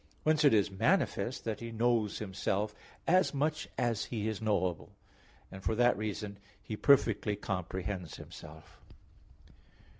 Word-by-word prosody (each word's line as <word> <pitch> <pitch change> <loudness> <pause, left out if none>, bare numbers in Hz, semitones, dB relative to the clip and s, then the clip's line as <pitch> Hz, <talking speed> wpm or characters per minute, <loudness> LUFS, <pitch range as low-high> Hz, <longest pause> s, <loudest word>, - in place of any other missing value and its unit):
Whence 155 0 +3
it 145 - +7
is 100 -3 +3
manifest 130 - +1
that 110 -2 -3
He 115 0 -6
knows 115 -2 +1
Himself 100 +1 -2 0.3
as 185 -3 +3
much 155 +2 -1
as 115 -3 0
He 110 -3 -3
is 110 -1 -3
knowable; 95 -6 -1 0.6
and 95 0 -9
for 110 - 0
that 120 +1 +4
reason 105 -1 -4 0.2
He 110 - -6
perfectly 110 -5 +3
comprehends 95 -2 -4
Himself. 80 +1 -12
110 Hz, 130 wpm, -32 LUFS, 100-120 Hz, 0.6 s, it